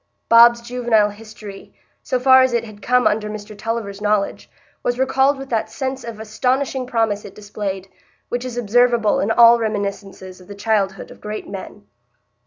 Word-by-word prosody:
Bob's 235 +1 +7
juvenile 235 -3 +1
history, 210 -1 -12 0.3
so 255 - -2
far 260 +1 +6
as 260 -1 +2
it 235 -1 +1
had 215 -2 -12
come 250 0 +2
under 210 0 +1
Mr 210 0 -8
Tulliver's 210 -2 -4
knowledge, 210 -1 -1 0.3
was 245 0 -1
recalled 265 +2 +2
with 270 0 -9
that 225 -2 -1
sense 265 -1 -4
of 230 -2 -8
astonishing 255 +4 -1
promise 225 -4 0
it 200 - -11
displayed, 200 -2 -6 0.4
which 245 0 -3
is 250 -2 -6
observable 240 -1 +2
in 200 - -1
all 235 +1 +6
reminiscences 200 -3 -5
of 180 - -17
the 205 - -9
childhood 200 -3 -1
of - - -15
great 210 0 -6
men. 200 +1 -9
220 Hz, 170 wpm, -20 LUFS, 205-245 Hz, 0.4 s, Bob's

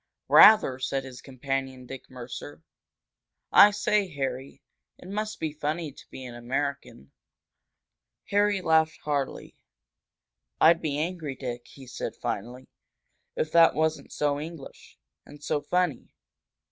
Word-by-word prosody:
"Rather!" 210 -12 +7
said 135 +1 -2
his 130 -2 -10
companion, 135 -1 -4
Dick 135 +1 -10
Mercer. 120 - -9 0.9
"I 205 - +9
say, 205 0 +1
Harry, 135 -1 -5 0.3
it - - -14
must 215 +2 -4
be 155 -2 -3
funny 155 +1 -3
to - - -17
be 130 - -9
an 125 - -8
American!" 120 - -4 1.2
Harry 205 -1 +2
laughed 160 -1 +2
heartily. 145 -3 -3 1.0
"I'd 165 +1 +5
be 145 -3 -2
angry, 160 -3 -3
Dick," 120 -2 -6
he 135 - -14
said, 125 - -6
finally, 125 +5 -5 0.7
"if 480 -1 -2
that 165 -1 +6
wasn't 160 0 -1
so 145 -1 0
English 160 -2 -10 0.3
and 145 0 -15
so 145 - -1
funny! 175 -2 -1
145 Hz, 125 wpm, -27 LUFS, 130-165 Hz, 1.2 s, I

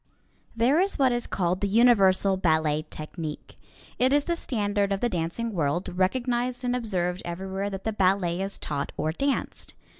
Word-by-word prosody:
There 245 +7 +3
is 390 +2 +1
what 265 -2 +3
is 240 0 -2
called 180 0 -1
the 200 - +1
Universal 195 -4 +4
Ballet 155 -3 +1
Technique. 155 0 -7 0.4
It 255 +1 +3
is 290 0 +3
the 340 - -1
standard 205 -8 -1
of 195 - 0
the 240 - +1
dancing 180 +6 -2
world, 170 +2 -1
recognized 245 +6 0
and 245 0 0
observed 185 -6 -2
everywhere 190 +3 -4
that 195 -1 -6
the 220 - -1
ballet 185 -3 +1
is 195 +1 -4
taught 145 -2 -3
or 155 - 0
danced. 275 - -3
195 Hz, 170 wpm, -26 LUFS, 175-240 Hz, 0.4 s, Universal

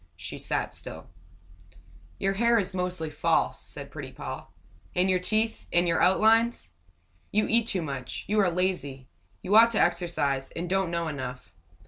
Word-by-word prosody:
She - - -7
sat - - -2
still. - - -9 1.1
"Your 195 0 0
hair 235 +3 +3
is 195 -3 0
mostly 180 -4 -2
false," 145 - +1
said - - -10
pretty - - -7
Poll. - - -7 0.5
"And 185 +1 +3
your 185 - +2
teeth 220 +4 0
and 175 +1 +3
your 170 - +2
outlines. 220 - +3 0.6
You 215 +1 +2
eat 230 0 +2
too 185 -6 0
much. 135 -4 -5
You 210 +1 +1
are 195 -3 +4
lazy. 170 -8 -2 0.3
You 200 - +1
ought 230 +1 +9
to 215 - +1
exercise, 170 -6 +1
and 170 +2 -3
don't 190 0 +1
know 170 -1 -1
enough. 130 -4 -6
180 Hz, 160 wpm, -27 LUFS, 160-210 Hz, 1.1 s, ought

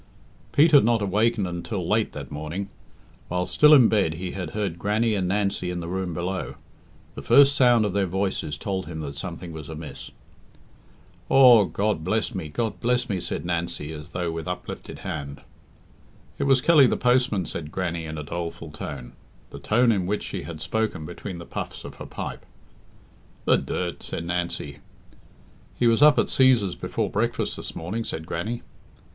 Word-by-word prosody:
Pete 155 +3 +5
had 145 -3 +7
not 115 -1 +2
awakened 105 +2 +1
until 90 +1 -4
late 110 0 +1
that 70 -1 -8
morning. 80 +7 -5 0.6
While 90 0 -1
still 150 +9 +5
in 135 -6 +8
bed 95 -7 +1
he 90 +2 -5
had 90 -4 -5
heard 95 -5 -2
Grannie 110 +4 +1
and 95 -3 0
Nancy 100 -2 0
in 90 0 -3
the 85 - -5
room 90 -1 -3
below. 90 +3 -3 0.6
The - - -7
first 140 - +6
sound 120 -5 +5
of 100 - -2
their 100 -1 +1
voices 95 -5 -2
told 95 +3 -3
him 80 -2 -5
that 70 -2 -6
something 85 +3 -6
was 80 -2 -8
amiss. 80 -2 -8 1.2
"Aw, 125 -6 +8
God 100 0 -1
bless 110 +7 0
me, 90 -6 -5
God 110 +8 -2
bless 125 +1 +1
me!" 95 -3 -1
said 85 - -4
Nancy, 85 -3 -2
as 75 +2 -9
though 85 -2 -2
with 80 -1 -5
uplifted 90 - -6
hands. 70 0 -5 1.0
"It 140 - 0
was 135 -2 +4
Kelly 150 -3 +6
the - - 0
postman," 125 -6 +2
said 75 0 -6
Grannie 85 -3 -3
in 80 0 -6
a 75 - -4
doleful 85 0 -5
tone 65 -5 -7 0.4
the - - -8
tone 120 +2 +3
in 95 -5 0
which 105 +2 -1
she 95 - -5
had 80 -3 -8
spoken 110 -8 -2
between 90 +2 -7
the 85 - -9
puffs - - -6
of - - -9
her - - -8
pipe. - - -6 1.0
"The - - +5
dirt!" - - -3
said 85 - -5
Nancy. 85 -5 -3 1.0
"He 120 - +1
was 115 +2 +4
up 150 0 +7
at - - +4
Cæsar's 125 -8 +4
before - - -3
breakfast - - -1
this - - -7
morning," 100 +8 -3
said 80 -6 -5
Grannie. 115 +7 -4
95 Hz, 180 wpm, -25 LUFS, 85-110 Hz, 1.2 s, in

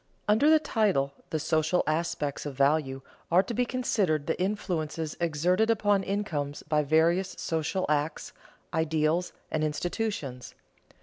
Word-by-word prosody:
_Under 220 +8 +4
the 315 - +7
title 210 - +1 0.2
"the 160 - -1
social 155 +3 +1
aspects 155 -2 -2
of 140 - -6
value" 140 -1 +1 0.3
are 180 +3 +5
to 235 - -5
be 250 +2 +1
considered 200 - 0
the 165 - -2
influences 165 -6 -2
exerted 175 +7 +2
upon 205 -3 +3
incomes 165 -8 -3
by 150 0 +1
various 165 +5 +2
social 165 +3 -1
acts, 150 +1 -1 0.4
ideals, 160 +1 +1 0.2
and 155 - 0
institutions. 155 - -3
160 Hz, 130 wpm, -28 LUFS, 150-195 Hz, 0.4 s, the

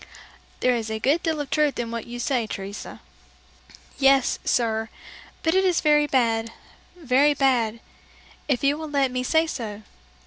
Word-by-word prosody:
'" - - -28
"There 255 - +3
is 225 -2 -3
a 220 - -2
good 280 +9 +1
deal 320 -2 -1
of 285 - -7
truth 300 -2 +1
in 235 -1 -3
what 230 -1 -5
you 240 +1 -7
say, 240 -2 -1
Teresa." 200 0 -7 1.0
"Yes, 270 -1 +3
sir, 225 -2 0 0.5
but 325 - +2
it 380 +1 +3
is 365 -3 +2
very 295 -1 +3
bad, 230 -4 +1 0.4
very 290 -2 +2
bad, 240 -5 +1 0.7
if 275 -3 0
you 285 +2 +2
will 315 -1 -6
let 275 -3 +1
me 255 0 -2
say 320 +6 +2
so! 220 -8 -6
260 Hz, 170 wpm, -24 LUFS, 230-295 Hz, 1.0 s, There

